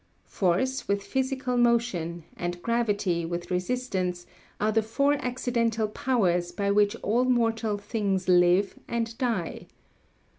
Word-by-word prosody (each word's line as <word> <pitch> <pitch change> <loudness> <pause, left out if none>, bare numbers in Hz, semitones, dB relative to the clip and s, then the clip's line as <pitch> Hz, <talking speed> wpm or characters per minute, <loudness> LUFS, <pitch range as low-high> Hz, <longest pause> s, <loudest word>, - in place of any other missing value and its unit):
Force, 205 +9 0
with 200 0 0
physical 260 +1 -1
motion, 230 -9 +1
and 175 0 -4
gravity, 205 -7 0
with 175 +2 -4
resistance, 180 -3 -2 0.3
are 215 +1 +2
the 225 +1 +3
four 280 +7 +1
accidental 235 -3 0
powers 185 -7 0
by 200 +2 -1
which 205 +1 +3
all 235 +4 +2
mortal 225 -4 +1
things 200 -3 -2
live 180 +2 +4
and 230 -1 -2
die. 230 - -2
210 Hz, 120 wpm, -27 LUFS, 180-240 Hz, 0.3 s, live